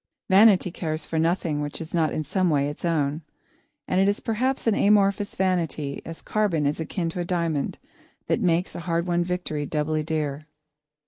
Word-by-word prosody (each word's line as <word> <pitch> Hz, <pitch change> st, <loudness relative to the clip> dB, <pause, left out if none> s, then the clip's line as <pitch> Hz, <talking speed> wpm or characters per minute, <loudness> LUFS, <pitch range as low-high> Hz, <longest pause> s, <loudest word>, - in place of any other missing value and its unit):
Vanity 195 Hz, -2 st, +6 dB
cares 155 Hz, -3 st, -3 dB
for 160 Hz, -, -2 dB
nothing 165 Hz, -2 st, 0 dB
which 145 Hz, 0 st, -4 dB
is 160 Hz, 0 st, -8 dB
not 160 Hz, -3 st, +2 dB
in 155 Hz, -, -2 dB
some 185 Hz, +5 st, +1 dB
way 140 Hz, -2 st, +2 dB
its 145 Hz, -, -7 dB
own, 155 Hz, -3 st, 0 dB, 0.7 s
and 185 Hz, -, +2 dB
it 195 Hz, -, +4 dB
is 205 Hz, +1 st, +1 dB
perhaps 255 Hz, +4 st, -1 dB
an 225 Hz, -, +3 dB
amorphous 200 Hz, 0 st, +3 dB
vanity, 170 Hz, -6 st, -1 dB
as 165 Hz, 0 st, -9 dB
carbon 195 Hz, -8 st, 0 dB
is 145 Hz, +3 st, 0 dB
akin 170 Hz, +2 st, -2 dB
to 180 Hz, -, -6 dB
a -, -, 0 dB
diamond, 170 Hz, -5 st, -1 dB, 0.5 s
that -, -, 0 dB
makes 175 Hz, +1 st, +1 dB
a -, -, -6 dB
hard 170 Hz, 0 st, -1 dB
won 175 Hz, -1 st, +1 dB
victory 175 Hz, -5 st, -3 dB
doubly 155 Hz, +1 st, -1 dB
dear. 150 Hz, -1 st, -3 dB
170 Hz, 185 wpm, -25 LUFS, 155-185 Hz, 0.7 s, Vanity